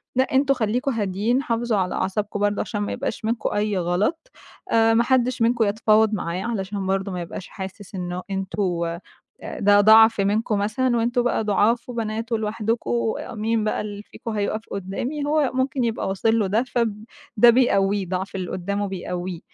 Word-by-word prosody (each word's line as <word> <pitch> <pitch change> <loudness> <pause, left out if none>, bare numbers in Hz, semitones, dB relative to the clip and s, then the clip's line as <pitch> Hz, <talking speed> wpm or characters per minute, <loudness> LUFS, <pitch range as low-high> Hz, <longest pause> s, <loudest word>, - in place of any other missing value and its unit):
لأ، 260 - +4
أنتم 275 0 +4
خليكوا 245 +3 -1
هاديين 215 +5 0
حافظوا 230 -2 0
على 185 -2 -1
أعصابكم 205 +2 -2
برضه 205 0 +1
عشان 205 -2 -3
ما 205 - -2
يبقاش 225 0 -4
منكم 230 +1 -1
أي 205 -1 0
غلط 205 - -1 0.4
آآ، 225 0 +4
ما 235 +1 +4
حدش 255 -2 +1
منكم 235 0 +3
يتفاوض 215 +1 +3
معاه 180 -1 -2
علشان 200 -4 -3
برضه 195 0 -1
ما 180 -1 -4
يبقاش 175 +2 -7
حاسس 190 +1 -8
إنه 180 0 -4
أنتم 180 -3 -2 0.6
ده 205 0 +5
ضعف 220 0 +7
منكم 210 +2 +1
مثلًا، 240 +4 +1
وأنتم 240 +2 +1
بقى 245 -2 0
ضُعاف 215 +4 +1
وبنات 225 -1 -3
ولوحدكم 215 - -1 0.2
مين 220 0 0
بقى 215 - -1
اللي 205 0 -6
فيكم 225 - -8
هيوقف 215 +1 -1
قدامي، 240 +10 -3
هو 295 -2 +2
ممكن 260 0 0
يبقى 225 -4 -1
واصل 225 +4 +1
له 205 - +1
ده، 215 +5 +1
فب 225 -4 -2 0.3
ده 240 +3 +8
بيقويه 200 -6 +3
ضعف 190 +2 -3
اللي 185 -2 -4
قدامه 200 +2 -2
بيقويه 180 -1 -5
210 Hz, 170 wpm, -23 LUFS, 195-230 Hz, 0.6 s, ده